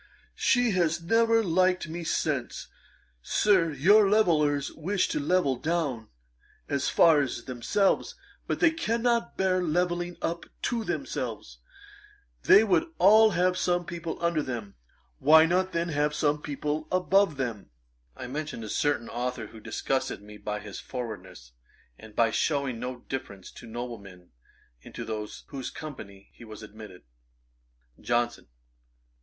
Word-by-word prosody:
She 245 -3 +3
has 170 -3 +1
never 225 +5 +3
liked 185 -1 +2
me 170 +2 -6
since. 145 -6 -2 0.5
Sir, 185 - +2
your 195 +9 +5
levellers 150 -9 +2
wish 185 +4 -1
to - - -1
level 145 -3 +1
down 145 -7 -2 0.6
as 140 -1 -1
far 160 -3 +5
as 130 -3 -3
themselves; 130 - 0 0.3
but - - -2
they 340 -3 +5
cannot 235 -6 0
bear 185 -1 +2
levelling 175 +1 -1
up 170 +1 -3 0.2
to 235 -2 -1
themselves. - - -4 0.8
They 200 +3 +7
would 225 - +1
all 215 +3 +7
have 180 +1 +2
some 175 -1 0
people 170 -1 -5
under 170 -2 +1
them; 115 -7 -5 0.5
why 160 +2 +7
not 185 +3 +1
then 170 0 -1
have 150 0 0
some 150 0 +1
people 150 +2 -3
above 185 -2 +2
them?' 115 -6 -4 0.5
I - - -6
mentioned 145 -2 -5
a 110 - -7
certain 145 -3 0
authour 125 -1 -3
who 115 - -12
disgusted 135 +4 -2
me 105 0 -12
by 105 0 -4
his 100 -2 -8
forwardness, 110 - -8 0.5
and 110 -1 -13
by 115 -1 +3
shewing 140 -3 0
no 125 0 -5
deference 100 -8 -6
to - - -12
noblemen 110 -7 -8 0.5
into - - -8 0.4
whose 135 -2 -5
company 100 -10 -10
he - - -14
was 110 -1 -10
admitted. 105 -3 -12 1.0
JOHNSON. 120 0 -1
150 Hz, 135 wpm, -27 LUFS, 120-180 Hz, 1.0 s, They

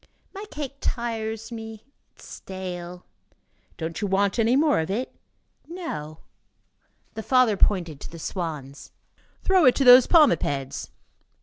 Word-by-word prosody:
"My 400 +1 -7
cake 280 -2 -6
tires 225 -2 -3
me. 225 -1 -8 0.3
It - - -20
is - - -13
stale." 180 -2 -8 0.7
"Don't 165 +3 -5
you 205 - -1
want 200 +3 +1
any 230 +2 +3
more 295 +1 +3
of 160 - -3
it?" 235 +7 -3 0.5
"No." 155 - -7 0.9
The 220 - -5
father 255 -2 +3
pointed 175 -7 +1
to - - -8
the 170 - -10
swans. 155 -5 -6 0.5
"Throw 375 -4 +4
it 255 - +6
to 275 - +1
those 250 0 +8
palmipeds." 145 - +2
220 Hz, 135 wpm, -24 LUFS, 175-255 Hz, 0.9 s, those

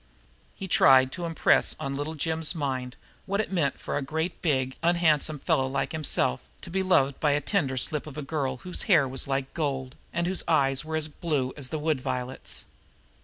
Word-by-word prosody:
He 195 - -6
tried 130 -6 +6
to 175 +2 -4
impress 165 - +3
upon 135 0 -4
Little 145 +3 -4
Jim's 160 +2 +1
mind 130 -4 -3 0.3
what 200 +1 0
it 220 - -1
meant 160 -7 0
for - - -3
a - - -1
great 160 +5 -3
big, 130 -5 0
unhandsome 165 -3 +2
fellow 130 -1 +1
like 135 0 -2
himself 65 - +1
to - - -8
be 190 +2 0
loved 140 -8 +2
by 150 -2 +3
a 145 - +2
tender 145 -7 0
slip 150 +4 -1
of 150 - -9
a 150 - -4
girl 135 -3 -2
whose 180 - -2
hair 155 -8 +5
was 130 +1 -2
like 135 0 -2
gold 135 -5 -2 0.2
and 170 0 -1
whose 185 +1 0
eyes 135 -4 +2
were 160 +1 -4
as 155 -1 +1
blue 145 -4 -2
as 145 -3 -5
the 155 - -2
wood 150 -3 0
violets. 125 +1 -4
145 Hz, 200 wpm, -27 LUFS, 135-160 Hz, 0.3 s, tried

